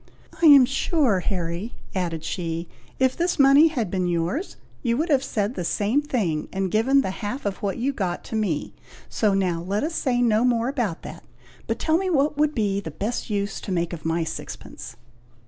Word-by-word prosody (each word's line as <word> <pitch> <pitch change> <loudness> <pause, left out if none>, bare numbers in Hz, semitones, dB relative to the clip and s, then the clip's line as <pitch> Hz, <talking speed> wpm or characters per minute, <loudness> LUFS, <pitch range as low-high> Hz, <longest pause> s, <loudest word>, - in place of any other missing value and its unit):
"I 330 - +7
am 280 -4 +9
sure, 270 - +1
Harry," 180 +3 -3 0.2
added 170 -4 -2
she, 165 0 -3 0.3
"if 260 -1 +2
this 350 +1 0
money 280 +2 +7
had 240 - -2
been 185 -2 0
yours, 175 - -2 0.2
you 235 -2 0
would 320 +4 -1
have 275 -3 +3
said 210 -3 -1
the 180 - -4
same 210 - +1
thing, 200 - -1
and 190 -1 -2
given 265 +6 +4
the 190 - -2
half 230 +5 -4
of 200 -1 -1
what 200 -2 -3
you 265 +4 0
got 185 -8 -3
to - - -6
me; 195 -9 -1 0.4
so 210 -3 +1
now 180 -4 0
let 195 +6 -2
us 320 +2 -2
say 255 -6 0
no 230 -2 +3
more 240 -1 +2
about 235 - -2
that, - - -9 0.4
but - - -1
tell 320 0 +2
me 380 0 -1
what 300 -2 +2
would 300 +1 +1
be 200 -3 0
the 190 - -6
best 210 +12 -4
use 200 -1 -2
to - - -6
make 170 -1 -1
of 165 - -7
my 165 +1 0
sixpence?" 155 - -8
215 Hz, 200 wpm, -24 LUFS, 180-270 Hz, 0.4 s, am